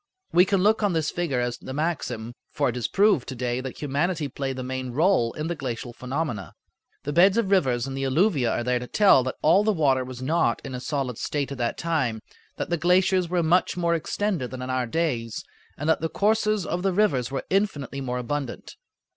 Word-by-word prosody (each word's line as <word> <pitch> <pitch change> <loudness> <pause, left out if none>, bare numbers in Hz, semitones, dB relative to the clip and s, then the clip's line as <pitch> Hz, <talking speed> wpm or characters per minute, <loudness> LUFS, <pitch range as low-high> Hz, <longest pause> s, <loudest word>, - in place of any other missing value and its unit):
We 175 +2 +6
can 195 -1 +1
look 220 +2 +3
on 205 -3 +2
this 160 -2 0
figure 165 -8 -1
as 120 0 -2
the 130 - -7
maximum, 125 -8 -2 0.2
for 140 -2 0
it 120 - -4
is 125 - -1
proved 200 - +3
to 130 - -5
day 125 0 -2
that 130 -1 -7
humanity 150 +3 0
played 135 0 -4
the 130 - -5
main 130 0 -4
role 155 -5 +3
in 155 - -4
the 170 - -1
glacial 120 -5 -5
phenomena. 125 -4 -4 0.5
The 145 - -3
beds 190 +6 +5
of 210 -4 +1
rivers 130 -11 +2
and 135 -1 -5
the 135 0 -2
alluvia 140 - +2
are 120 - -1
there 125 0 +1
to 125 - -7
tell 195 -9 +5
that 130 - -3
all 175 +7 +5
the 215 - +3
water 140 -8 +2
was 130 -1 -8
not 145 -2 +1
in 135 - -6
a 125 - -4
solid 130 -3 -3
state 145 -2 -2
at 140 - -6
that 120 -1 -1
time, 135 -10 -1 0.3
that - - -4
the 170 - +2
glaciers 180 +1 +3
were 175 -1 +1
much 175 +3 +2
more 170 -1 +1
extended 170 -4 -1
than 130 -1 -6
in 130 - -4
our 130 -1 0
days, 120 -6 -2 0.3
and 150 - -4
that 160 - +2
the 160 - -1
courses 215 -1 +1
of 175 - -2
the 195 0 +1
rivers 160 - +2
were 135 -1 -4
infinitely 150 -9 -1
more 125 -1 -3
abundant. 125 +1 -4
145 Hz, 220 wpm, -25 LUFS, 125-175 Hz, 0.5 s, We